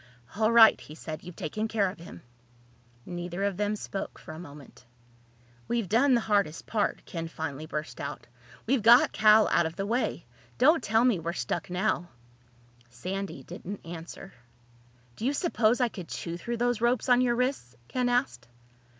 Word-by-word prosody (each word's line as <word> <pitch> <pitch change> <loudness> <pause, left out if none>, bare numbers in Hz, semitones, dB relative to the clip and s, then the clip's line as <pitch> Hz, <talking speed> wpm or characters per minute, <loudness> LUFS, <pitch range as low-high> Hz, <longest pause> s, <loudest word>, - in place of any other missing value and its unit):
"All 220 +2 +2
right," 230 -1 +7
he 150 - -11
said. 155 -1 -7
"You've 180 -1 -10
taken 215 +5 -3
care 215 -3 +1
of 185 - -7
him." 125 - -11 0.8
Neither 175 +1 -5
of 200 -1 0
them 210 +2 -1
spoke 200 -1 -6
for 160 - -10
a 160 - -9
moment. 145 -6 -12 0.8
"We've 235 -4 -1
done 250 +7 +4
the 235 - +2
hardest 200 -7 0
part," 215 -2 -1
Ken 165 -1 -5
finally 155 -2 -6
burst 155 0 -5
out. 140 -1 -6 0.4
"We've 260 +1 +2
got 235 +3 +7
Cal 215 0 +5
out 170 -1 +3
of 160 - -8
the 195 - -3
way. 235 +5 -1 0.3
Don't 305 +4 +5
tell 225 +3 +3
me 235 -8 +3
we're 165 +1 -3
stuck 120 0 -3
now!" 180 -1 -1 0.8
Sandy 185 +5 -5
didn't 195 +9 -8
answer. 170 +3 -9 0.8
"Do - - -8
you 280 - +1
suppose 245 -7 +1
I 245 - +3
could 185 -7 -8
chew 170 -1 -5
through 235 +7 -4
those 240 -1 0
ropes 240 +1 +1
on 250 0 +5
your 240 -1 +2
wrists?" 250 - -2
Ken 250 -1 0
asked. 245 - -1
200 Hz, 175 wpm, -28 LUFS, 165-235 Hz, 0.8 s, right